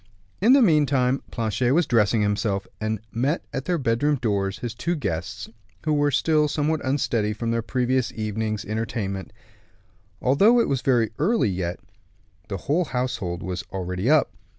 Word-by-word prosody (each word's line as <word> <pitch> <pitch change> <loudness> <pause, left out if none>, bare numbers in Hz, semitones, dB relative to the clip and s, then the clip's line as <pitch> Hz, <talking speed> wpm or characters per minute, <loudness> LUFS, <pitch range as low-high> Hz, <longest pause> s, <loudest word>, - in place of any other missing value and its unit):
In 230 +6 +6
the 275 -2 +6
meantime 140 - +3
Planchet 115 +2 0
was 170 0 +3
dressing 110 -2 +2
himself, 105 -1 0
and 110 -1 -2
met 135 +8 -1
at 135 - -3
their 175 +1 +1
bedroom 135 +2 +1
doors 100 -6 -1
his 120 -2 -5
two 170 +9 -2
guests, 95 - -4 0.4
who 155 -1 +1
were 145 0 +3
still 150 +2 +2
somewhat 150 0 -1
unsteady 120 -6 0
from 115 +2 -3
their 115 0 0
previous 125 +1 0
evening's 110 -1 -3
entertainment. 105 -3 -3 0.9
Although 200 - +4
it - - +2
was 135 - 0
yet - - -15
very 120 -4 +3
early, 165 - +2 0.9
the 100 - -4
whole 165 +6 +1
household 125 - -3
was 90 0 -4
already 90 +4 -2
up. 155 -1 +4
120 Hz, 155 wpm, -24 LUFS, 105-145 Hz, 0.9 s, In